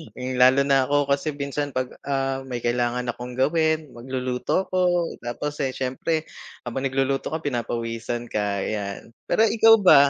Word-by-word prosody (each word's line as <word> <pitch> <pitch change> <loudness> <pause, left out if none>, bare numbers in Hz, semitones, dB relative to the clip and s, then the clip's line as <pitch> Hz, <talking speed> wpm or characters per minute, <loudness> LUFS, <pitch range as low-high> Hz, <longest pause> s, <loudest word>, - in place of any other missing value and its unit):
Hmm, 130 0 -4
lalo 130 +2 +6
na 135 -1 +4
ako 145 0 +2
kasi 140 +2 +1
minsan 145 0 -3
'pag 130 0 -1 0.2
ah, 135 -1 -1
may 125 -2 -4
kailangan 120 +1 0
akong 120 +1 -5
gawin, 155 +2 +2
magluluto 125 +6 -2
ako, 180 -2 +2
tapos 145 +5 -4
eh, 135 - 0
siyempre 135 +5 -2 0.4
habang 130 +3 -3
nagluluto 135 0 0
ka 160 - -1
pinapawisan 120 -3 -3
ka 100 -1 -1
yan. 100 -1 -4 0.2
Pero - - +2
ikaw 225 0 +7
ba? 180 -7 +8
130 Hz, 155 wpm, -24 LUFS, 120-145 Hz, 0.4 s, ba